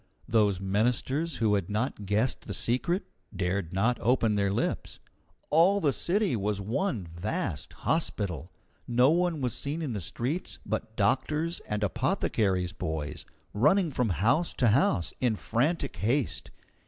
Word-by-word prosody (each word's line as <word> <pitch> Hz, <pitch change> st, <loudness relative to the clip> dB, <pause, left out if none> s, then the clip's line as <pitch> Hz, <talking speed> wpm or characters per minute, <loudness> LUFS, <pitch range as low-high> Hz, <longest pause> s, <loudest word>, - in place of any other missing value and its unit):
Those 105 Hz, -4 st, +3 dB
ministers 125 Hz, -, 0 dB
who 110 Hz, -2 st, +2 dB
had 100 Hz, -2 st, 0 dB
not 105 Hz, -1 st, -2 dB
guessed 110 Hz, +6 st, 0 dB
the -, -, -3 dB
secret 170 Hz, -, 0 dB, 0.3 s
dared 90 Hz, -1 st, -1 dB
not 110 Hz, +6 st, +1 dB
open 115 Hz, -3 st, +3 dB
their 100 Hz, -1 st, +1 dB
lips. 100 Hz, -, -2 dB, 0.5 s
All 175 Hz, +6 st, +5 dB
the 145 Hz, -7 st, +2 dB
city 195 Hz, -, +1 dB
was 105 Hz, -1 st, -1 dB
one 115 Hz, -, -1 dB
vast 85 Hz, +1 st, -3 dB
hospital. 100 Hz, -, -1 dB, 0.4 s
No 125 Hz, +4 st, +4 dB
one 170 Hz, -2 st, +1 dB
was 125 Hz, -3 st, 0 dB
seen 145 Hz, +3 st, -3 dB
in 150 Hz, -7 st, -3 dB
the 105 Hz, -, -3 dB
streets 130 Hz, -, -3 dB
but 110 Hz, +1 st, -3 dB
doctors 150 Hz, -, +1 dB
and 105 Hz, 0 st, -2 dB
apothecaries' 105 Hz, -, 0 dB
boys, 80 Hz, -2 st, -4 dB, 0.3 s
running 155 Hz, -, +3 dB
from 125 Hz, -4 st, 0 dB
house 115 Hz, -, +1 dB
to 120 Hz, -, +3 dB
house 95 Hz, -4 st, +2 dB
in 120 Hz, -4 st, +2 dB
frantic 140 Hz, -, -1 dB
haste. 120 Hz, +6 st, 0 dB
115 Hz, 140 wpm, -29 LUFS, 100-150 Hz, 0.5 s, All